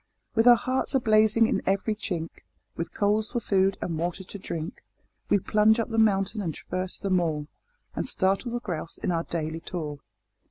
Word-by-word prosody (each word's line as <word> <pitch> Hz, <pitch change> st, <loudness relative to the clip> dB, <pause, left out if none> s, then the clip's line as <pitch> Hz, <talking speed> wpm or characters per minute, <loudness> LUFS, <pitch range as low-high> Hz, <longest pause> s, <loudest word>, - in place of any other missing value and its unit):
With 225 Hz, 0 st, +3 dB
our 240 Hz, -, +10 dB
hearts 255 Hz, +3 st, -1 dB
a -, -, +5 dB
blazing 220 Hz, 0 st, +4 dB
in -, -, 0 dB
every 195 Hz, +3 st, +1 dB
chink, 175 Hz, -6 st, -5 dB, 0.3 s
With 170 Hz, -, -4 dB
coals 210 Hz, +1 st, +1 dB
for 240 Hz, -, -1 dB
food 195 Hz, -3 st, +2 dB
and 165 Hz, -3 st, -3 dB
water 175 Hz, +3 st, -2 dB
to 200 Hz, +2 st, -8 dB
drink, 165 Hz, -3 st, -6 dB, 0.5 s
We -, -, +5 dB
plunge 215 Hz, +3 st, +3 dB
up 230 Hz, -, -1 dB
the 225 Hz, -1 st, 0 dB
mountain 205 Hz, 0 st, +2 dB
and 165 Hz, -6 st, -3 dB
traverse 185 Hz, 0 st, -3 dB
the 195 Hz, -, -3 dB
moor, 165 Hz, -5 st, +1 dB, 0.5 s
And -, -, -3 dB
startle 195 Hz, +5 st, 0 dB
the 240 Hz, 0 st, -3 dB
grouse 170 Hz, -7 st, -5 dB
in -, -, -2 dB
our 165 Hz, -1 st, 0 dB
daily 160 Hz, -1 st, -3 dB
tour. 155 Hz, -4 st, -5 dB
195 Hz, 190 wpm, -27 LUFS, 170-220 Hz, 0.5 s, our